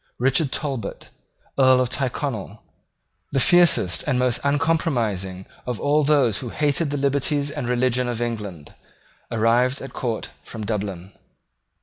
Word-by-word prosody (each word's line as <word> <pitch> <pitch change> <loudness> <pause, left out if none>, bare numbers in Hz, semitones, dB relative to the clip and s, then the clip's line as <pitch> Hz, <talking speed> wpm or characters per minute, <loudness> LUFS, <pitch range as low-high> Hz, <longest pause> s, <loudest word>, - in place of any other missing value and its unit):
Richard 135 +3 +2
Talbot, 135 -9 -4 0.5
Earl 130 -1 +6
of 125 -1 0
Tyrconnel, 125 -5 -3 0.7
the 135 - +2
fiercest 175 - +5
and 135 -4 +1
most 125 -1 +2
uncompromising 125 - 0 0.2
of 125 -3 -3
all 150 +1 +2
those 140 -7 +3
who 125 - -6
hated 150 +3 0
the 145 - -2
liberties 140 +1 0
and 150 -6 -4
religion 125 0 +1
of 120 -2 -3
England, 105 -10 -5 0.6
arrived 120 +4 +2
at 135 - -9
court 115 -4 -3
from 110 -2 -7
Dublin. 100 -4 -4
125 Hz, 130 wpm, -23 LUFS, 110-140 Hz, 0.7 s, Earl